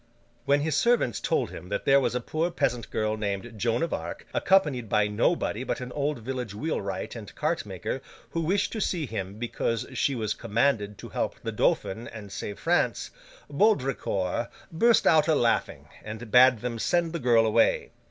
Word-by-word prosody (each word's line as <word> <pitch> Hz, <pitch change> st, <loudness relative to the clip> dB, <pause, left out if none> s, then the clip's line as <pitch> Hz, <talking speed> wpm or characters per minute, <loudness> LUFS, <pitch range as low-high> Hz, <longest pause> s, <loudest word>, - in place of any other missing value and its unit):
When 140 Hz, +1 st, +3 dB
his 155 Hz, -1 st, 0 dB
servants 235 Hz, -, +2 dB
told -, -, 0 dB
him 90 Hz, -, -9 dB
that 100 Hz, -, -3 dB
there 140 Hz, 0 st, +6 dB
was 130 Hz, -, 0 dB
a -, -, +1 dB
poor 155 Hz, +7 st, -1 dB
peasant 120 Hz, -8 st, -1 dB
girl 110 Hz, 0 st, -1 dB
named 105 Hz, +2 st, -3 dB
Joan 115 Hz, +5 st, 0 dB
of 165 Hz, -, -2 dB
Arc, 80 Hz, +1 st, -5 dB
accompanied 145 Hz, -, +2 dB
by 105 Hz, 0 st, +3 dB
nobody 110 Hz, +1 st, 0 dB
but -, -, -2 dB
an 125 Hz, 0 st, -6 dB
old 145 Hz, +1 st, -1 dB
village 120 Hz, -3 st, -5 dB
wheelwright 100 Hz, -8 st, -3 dB
and 105 Hz, -8 st, -9 dB
cart -, -, -1 dB
maker, -, -, -4 dB, 0.3 s
who 165 Hz, -, -1 dB
wished 185 Hz, +5 st, +1 dB
to 220 Hz, -, -3 dB
see 175 Hz, -5 st, 0 dB
him 100 Hz, -4 st, -5 dB
because 115 Hz, -1 st, -2 dB
she 140 Hz, -, +1 dB
was 110 Hz, -3 st, -1 dB
commanded 105 Hz, -3 st, 0 dB
to -, -, -9 dB
help -, -, -2 dB
the -, -, -2 dB
Dauphin 115 Hz, +5 st, 0 dB
and 105 Hz, -3 st, -9 dB
save 100 Hz, +1 st, -5 dB
France, -, -, 0 dB, 0.4 s
Baudricourt 135 Hz, -, +1 dB, 0.2 s
burst 230 Hz, +7 st, +4 dB
out 155 Hz, -1 st, +5 dB
a 160 Hz, -, +4 dB
laughing, 120 Hz, -4 st, 0 dB, 0.2 s
and 110 Hz, +1 st, -7 dB
bade 125 Hz, -2 st, +6 dB
them 120 Hz, -2 st, -3 dB
send 170 Hz, +5 st, +1 dB
the 170 Hz, -, -2 dB
girl 120 Hz, -4 st, +4 dB
away. 110 Hz, -, +2 dB
120 Hz, 180 wpm, -27 LUFS, 105-150 Hz, 0.4 s, there